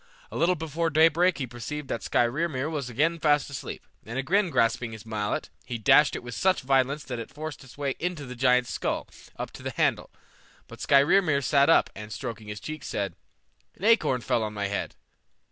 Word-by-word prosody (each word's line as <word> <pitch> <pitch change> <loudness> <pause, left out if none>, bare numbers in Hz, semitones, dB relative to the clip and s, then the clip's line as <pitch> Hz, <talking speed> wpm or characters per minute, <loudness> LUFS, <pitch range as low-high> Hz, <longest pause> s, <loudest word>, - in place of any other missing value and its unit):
A - - -8
little 175 +3 +3
before 160 +1 -2
daybreak 165 +3 +4
he 135 - -2
perceived 125 +5 -6
that - - -2
Skrymir 140 +3 0
was 140 -5 -3
again 160 +8 +1
fast 145 -2 +2
asleep, 140 - -7 0.2
and 115 +4 -6
again 180 +8 +2
grasping 115 -4 +1
his 110 0 -10
mallet, 105 -2 -3
he 120 - -4
dashed 145 +6 +5
it - - -5
with 125 0 -7
such 190 +7 +2
violence 135 +2 +1
that 125 -2 -5
it 115 - -6
forced 155 -1 -7
its 130 0 -15
way 140 -2 -1
into 175 -4 -3
the 125 - -7
giant's 125 0 +2
skull - - -2 0.3
up - - -5
to - - -11
the - - -3
handle. - - 0 0.6
But - - -12
Skrymir 145 +1 +4
sat 140 +1 +4
up, 165 - +4
and 105 0 -8
stroking 115 -3 -6
his 105 0 -6
cheek 155 +5 -7
said, 100 -3 -3 0.6
"An - - -15
acorn 215 - +3
fell 120 - 0
on 105 -1 -3
my 100 -1 -2
head. 100 - -3
140 Hz, 195 wpm, -27 LUFS, 120-155 Hz, 0.6 s, dashed